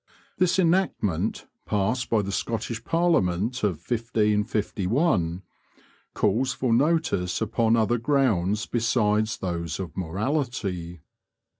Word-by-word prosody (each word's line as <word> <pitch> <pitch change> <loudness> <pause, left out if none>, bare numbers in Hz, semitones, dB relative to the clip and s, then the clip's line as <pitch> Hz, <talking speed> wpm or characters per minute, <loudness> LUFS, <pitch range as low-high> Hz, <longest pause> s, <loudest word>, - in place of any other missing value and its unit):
This 180 0 +3
enactment, 165 - +1 0.2
passed 110 +5 0
by 110 -3 +2
the 100 - -4
Scottish 115 +2 -3
parliament 125 - +1
of 95 -6 +1
1551, 105 - 0 0.7
calls 120 +6 +1
for 130 -2 0
notice 130 - +1
upon 115 +1 +2
other 115 +1 +2
grounds 110 -7 +1
besides 110 -2 +1
those 85 -3 -3
of 95 -3 -6
morality. 95 - -3
110 Hz, 100 wpm, -25 LUFS, 95-125 Hz, 0.7 s, This